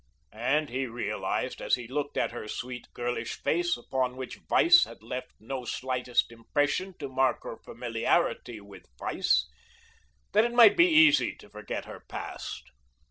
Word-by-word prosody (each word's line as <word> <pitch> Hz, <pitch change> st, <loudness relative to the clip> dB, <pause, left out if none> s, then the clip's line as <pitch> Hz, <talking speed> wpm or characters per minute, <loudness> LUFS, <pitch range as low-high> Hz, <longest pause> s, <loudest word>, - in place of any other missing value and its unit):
And 140 Hz, +7 st, 0 dB
he 130 Hz, +2 st, -2 dB
realized 115 Hz, -3 st, -3 dB
as -, -, +2 dB
he 120 Hz, -2 st, -8 dB
looked 145 Hz, +3 st, -3 dB
at -, -, +1 dB
her 115 Hz, -2 st, -7 dB
sweet 125 Hz, +2 st, -6 dB
girlish 120 Hz, -1 st, -3 dB
face 175 Hz, -1 st, 0 dB
upon 125 Hz, +1 st, -2 dB
which 130 Hz, -1 st, -7 dB
vice 340 Hz, -1 st, +6 dB
had -, -, -13 dB
left 125 Hz, +2 st, -5 dB
no 130 Hz, +3 st, -5 dB
slightest 125 Hz, 0 st, -1 dB
impression 145 Hz, +10 st, -1 dB
to 140 Hz, -, -5 dB
mark 130 Hz, 0 st, +1 dB
her -, -, -7 dB
familiarity 120 Hz, -3 st, -1 dB
with 100 Hz, -1 st, -14 dB
vice, -, -, +1 dB, 0.8 s
that 215 Hz, +2 st, +5 dB
it 240 Hz, 0 st, -1 dB
might 235 Hz, -4 st, +8 dB
be 345 Hz, +1 st, +6 dB
easy 315 Hz, -3 st, +5 dB
to -, -, -17 dB
forget 105 Hz, 0 st, -5 dB
her -, -, -9 dB
past. -, -, -7 dB
130 Hz, 155 wpm, -28 LUFS, 120-155 Hz, 0.8 s, might